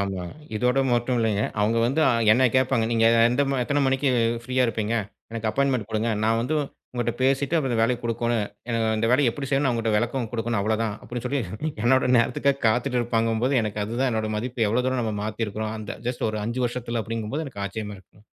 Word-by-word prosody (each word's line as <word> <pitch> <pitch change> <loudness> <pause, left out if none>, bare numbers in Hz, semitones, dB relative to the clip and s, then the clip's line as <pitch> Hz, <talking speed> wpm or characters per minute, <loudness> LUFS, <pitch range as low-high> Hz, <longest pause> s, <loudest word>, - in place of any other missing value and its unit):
ஆமா. 95 -2 -2 0.3
இதோட 125 +4 +2
மட்டும் 120 +1 +1
இல்லைங்க. 110 -3 +1 0.2
அவங்க 110 +3 +2
வந்து 140 +6 0 0.3
என்னைக் 125 +1 +3
கேப்பாங்க. 130 -3 +2
நீங்க 115 -1 +3 0.2
எந்த 125 +4 +2
ம 135 - 0
எத்தனை 145 +3 +1
மணிக்கு 135 +1 +1 0.4
ஃப்ரீயா 130 0 +1
இருப்பீங்க? 115 -1 -1 0.4
எனக்கு 115 -1 -3
அப்பாய்ன்மென்ட் 130 -4 0
கொடுங்க. 110 +1 0 0.2
நான் 115 +1 +2
வந்து 135 +7 -1 0.4
உங்ககிட்ட 120 -1 -1
பேசிட்டு 135 +4 +1
அப்புறம் 135 -5 0
இந்த 115 - 0
வேலையை 120 +1 +2
கொடுக்கணும். 115 -1 0 0.2
எனக்கு 115 -1 0
இந்த 115 - +1
வேலையை 130 0 +4
எப்படி 135 +3 -5
செய்யணும்னு 135 -1 +2
அவங்ககிட்ட 115 -2 0
விளக்கம் 120 +1 -1
கொடுக்கணும் 115 -2 -1
அவ்வளவுதான் 110 +1 0
அப்படின்னு 120 0 -6
சொல்லி 140 +2 0 0.4
என்னோட 130 0 +3
நேரத்துக்காகக் 135 +4 +1
காத்துட்டு 125 +3 +1
இருப்பாங்கும்போது 115 +2 +1
எனக்கு 105 -1 -2
அதுதான் 125 +4 -1
என்னோட 110 -1 -1
மதிப்பு 120 0 -1
எவ்வளவு 125 +4 +1
தூரம் 130 -1 0
நம்ம 110 -2 -2
மாத்திருக்குறோம். 110 0 -3
அந்த 110 - -7
ஜஸ்ட் 125 - -3
ஒரு 110 0 -3
5 120 +3 -2
வருஷத்துல 120 -1 -3
அப்படிங்கும்போது 115 +7 -3
எனக்கு 100 -7 -7
ஆச்சரியமா 105 +1 -5
இருக்கும்ங்க. 100 +2 -22
115 Hz, 190 wpm, -24 LUFS, 110-130 Hz, 0.4 s, வேலையை